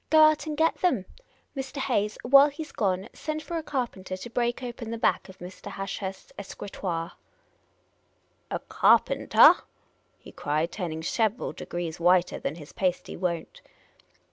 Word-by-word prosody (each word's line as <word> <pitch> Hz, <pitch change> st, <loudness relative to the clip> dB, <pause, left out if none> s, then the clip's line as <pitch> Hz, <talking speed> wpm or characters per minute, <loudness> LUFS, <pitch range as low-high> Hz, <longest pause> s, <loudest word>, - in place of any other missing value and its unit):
" -, -, -45 dB
Go 315 Hz, 0 st, +7 dB
out 310 Hz, +1 st, +4 dB
and 300 Hz, -1 st, -3 dB
get 325 Hz, +1 st, +2 dB
them! 260 Hz, -, +2 dB, 0.5 s
Mr. 270 Hz, +1 st, -5 dB
Hayes, 215 Hz, -6 st, 0 dB
while 275 Hz, +3 st, +7 dB
he 290 Hz, +3 st, -6 dB
's 305 Hz, -, -13 dB
gone, 190 Hz, -1 st, -1 dB
send 310 Hz, -1 st, -4 dB
for 340 Hz, 0 st, -4 dB
a -, -, -4 dB
carpenter 240 Hz, -11 st, -4 dB
to 215 Hz, +6 st, -8 dB
break 240 Hz, +1 st, -1 dB
open 240 Hz, -2 st, -6 dB
the 230 Hz, -, -3 dB
back 225 Hz, -, +1 dB
of 190 Hz, -, -12 dB
Mr. 180 Hz, +2 st, -9 dB
Ashurst's 195 Hz, 0 st, -5 dB
escritoire." 185 Hz, -4 st, -5 dB, 0.7 s
" -, -, -42 dB
A -, -, -1 dB
carpentah? -, -, +5 dB, 0.3 s
" -, -, -42 dB
he -, -, -11 dB
cried, 155 Hz, +3 st, -1 dB
turning 160 Hz, -5 st, -4 dB
several 220 Hz, +5 st, 0 dB
degrees 175 Hz, -2 st, -5 dB
whiter 180 Hz, +1 st, +3 dB
than 150 Hz, -, -3 dB
his 150 Hz, -3 st, -12 dB
pasty 180 Hz, -2 st, -1 dB
won't. 170 Hz, -3 st, -3 dB
205 Hz, 165 wpm, -27 LUFS, 180-270 Hz, 0.7 s, Go